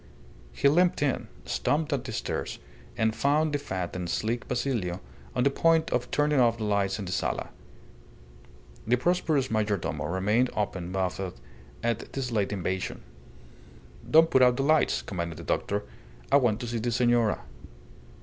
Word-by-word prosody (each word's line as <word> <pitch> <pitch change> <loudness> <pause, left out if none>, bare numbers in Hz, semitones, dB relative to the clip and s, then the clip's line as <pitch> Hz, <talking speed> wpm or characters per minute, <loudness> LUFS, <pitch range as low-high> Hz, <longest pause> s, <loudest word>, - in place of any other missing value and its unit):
He 140 - +2
limped 175 +2 +3
in, 140 -3 0 0.2
stumped 155 +1 0
up 130 -2 -2
the 125 - -5
stairs, - - -3 0.4
and 110 -1 +1
found 150 +2 +2
the 145 - +1
fat 95 -10 -4
and 90 -1 -4
sleek 115 +6 -1
Basilio 115 -9 -1 0.4
on 125 - +2
the 140 - +3
point 165 +2 +2
of 125 0 0
turning 150 -1 +2
off 115 -2 +4
the 110 - -4
lights 100 -2 +1
in 100 - -5
the 90 - -5
sala. 90 - -2 1.4
The 120 - +4
prosperous 155 -1 +1
majordomo 105 -7 -1
remained 105 +7 +2
open 95 -4 -2
mouthed 95 -5 -2 0.4
at 115 -1 -2
this 130 -3 -3
late 105 -3 0
invasion. 95 -1 -3 1.1
"Don't 160 +1 +6
put 130 - +5
out 125 -1 +5
the 135 - +1
lights," 155 +2 +3
commanded 85 -4 -4
the 85 - -8
doctor. 100 +4 -1 0.5
"I 140 - +7
want 120 -5 +2
to 120 - -4
see 115 0 -2
the 120 +2 -1
senora." 120 -2 +2
120 Hz, 160 wpm, -28 LUFS, 100-140 Hz, 1.4 s, I